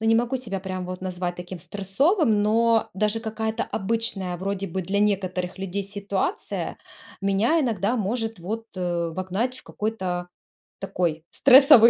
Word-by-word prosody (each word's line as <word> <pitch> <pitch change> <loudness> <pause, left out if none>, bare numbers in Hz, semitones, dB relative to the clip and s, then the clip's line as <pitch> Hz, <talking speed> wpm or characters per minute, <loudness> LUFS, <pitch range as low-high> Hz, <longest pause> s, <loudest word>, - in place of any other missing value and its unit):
ну, 220 - -1
не 225 - +5
могу 240 +3 +2
себя 210 -7 -4
прям 185 -1 -4
вот 185 0 -5
назвать 180 -1 -2
таким 180 +1 -7
стрессовым, 205 - +2
но 225 +1 +3
даже 210 +3 +1
какая-то 220 0 -2
обычная 200 -4 -1
вроде 195 +2 -2
бы 190 +1 -3
для 195 +3 0
некоторых 185 -3 0
людей 195 +1 -2
ситуация 200 - -2 0.5
меня 205 +12 +3
иногда 225 -2 +1
может 225 +1 -1
вот, 220 +6 -4
э, 175 -2 -1
вогнать 190 +8 -1
в - - -14
какой-то 185 -5 -3 0.5
такой 175 -5 -1
стрессовый 265 -3 +8
200 Hz, 145 wpm, -25 LUFS, 185-225 Hz, 0.5 s, стрессовый